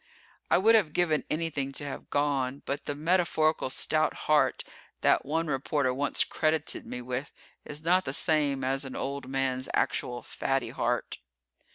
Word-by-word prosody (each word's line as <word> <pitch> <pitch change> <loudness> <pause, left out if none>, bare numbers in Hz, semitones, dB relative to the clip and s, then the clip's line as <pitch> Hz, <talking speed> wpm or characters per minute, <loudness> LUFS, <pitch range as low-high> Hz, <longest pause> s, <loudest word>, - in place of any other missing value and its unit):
I - - +5
would 220 +4 +5
have 195 -9 +3
given 160 -4 +1
anything 155 -4 -2
to 145 - -4
have 140 - -7
gone, 140 -2 0
but 140 - -3
the 145 - -2
metaphorical 160 -2 +1
stout 155 +4 +1
heart 150 -4 +3 0.4
that - - +3
one 160 +3 0
reporter 140 -2 0
once 140 +2 +2
credited 155 -1 -1
me 125 0 -6
with 125 +3 -4 0.3
is 150 +1 -5
not 180 +3 +3
the 135 - -2
same 145 -3 +2
as 135 +2 0
an 135 -1 -7
old 140 -1 -4
man's 130 -1 -1
actual 120 0 -1
fatty 135 -1 -2
heart. - - -2
145 Hz, 160 wpm, -28 LUFS, 135-155 Hz, 0.4 s, I